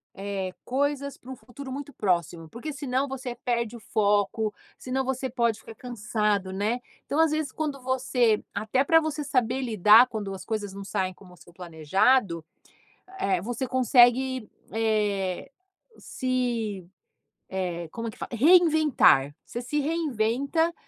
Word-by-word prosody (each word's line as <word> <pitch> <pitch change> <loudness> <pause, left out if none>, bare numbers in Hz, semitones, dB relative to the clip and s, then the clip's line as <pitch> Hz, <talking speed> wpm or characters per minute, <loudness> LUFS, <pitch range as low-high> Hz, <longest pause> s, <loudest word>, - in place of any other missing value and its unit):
eh, 195 -1 -4
coisas 280 +1 -1
pra 255 - -15
um - - -6
futuro 260 +2 -10
muito 285 +1 -6
próximo, 170 -4 -1
porque 280 +6 -6
senão 270 0 -1
você 255 -2 -5
perde 235 -2 -2
o - - -9
foco, 210 +1 +1 0.3
senão 260 +1 -2
você 260 0 -2
pode 235 -3 0
ficar 225 - -12
cansado, 210 -5 -1
né. 210 +6 -1 0.3
Então, 290 - -1
às 325 -1 +5
vezes, 310 -3 -1
quando 295 -3 -3
você 250 -3 +1
até 215 +6 +1
pra 325 +3 +5
você 310 -1 -3
saber 255 -1 0
lidar 220 +1 +6
quando 210 -5 -5
as 185 -1 -8
coisas 210 -3 -3
não 200 0 -7
saem 185 -1 -2
como 180 -1 -17
o - - -17
seu 170 +2 -18
planejado, 170 - +1 0.8
eh, 190 -3 +1
você 245 +4 -3
consegue, 255 -1 +3 0.2
eh, 210 -4 0 0.5
se 235 -7 -2 0.6
eh, 175 -3 -3
como 230 0 -5
é - - -4
que - - -17
fala? - - -6
Reinventar. 300 - +5
Você 240 - -5
se 295 +5 -2
reinventa, 285 +1 0
235 Hz, 150 wpm, -26 LUFS, 200-265 Hz, 0.8 s, lidar